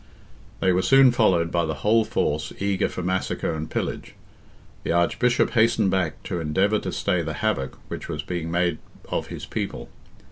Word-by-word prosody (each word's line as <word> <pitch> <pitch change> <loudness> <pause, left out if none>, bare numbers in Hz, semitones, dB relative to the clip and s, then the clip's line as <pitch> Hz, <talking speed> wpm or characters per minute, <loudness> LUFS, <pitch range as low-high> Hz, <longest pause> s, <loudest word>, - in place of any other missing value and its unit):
They 95 - +3
were 90 - +2
soon 135 +3 +6
followed 90 -8 +2
by 85 -1 +1
the 80 - -2
whole 110 +2 +5
force 75 -5 -1
eager 100 -1 0
for 90 - -5
massacre 90 -2 -1
and 80 0 -5
pillage. - - -4 0.7
The - - -2
Archbishop 85 +9 +2
hastened 110 -4 +3
back 90 -5 -1
to 90 -3 -3
endeavour 95 +7 +1
to - - -4
stay 90 - 0
the 80 -1 -4
havoc 100 -11 -1
which - - -7
was 75 -1 -3
being 85 -1 -4
made 85 -1 0 0.3
of - - -2
his - - -7
people. - - -4
90 Hz, 175 wpm, -24 LUFS, 80-105 Hz, 0.7 s, soon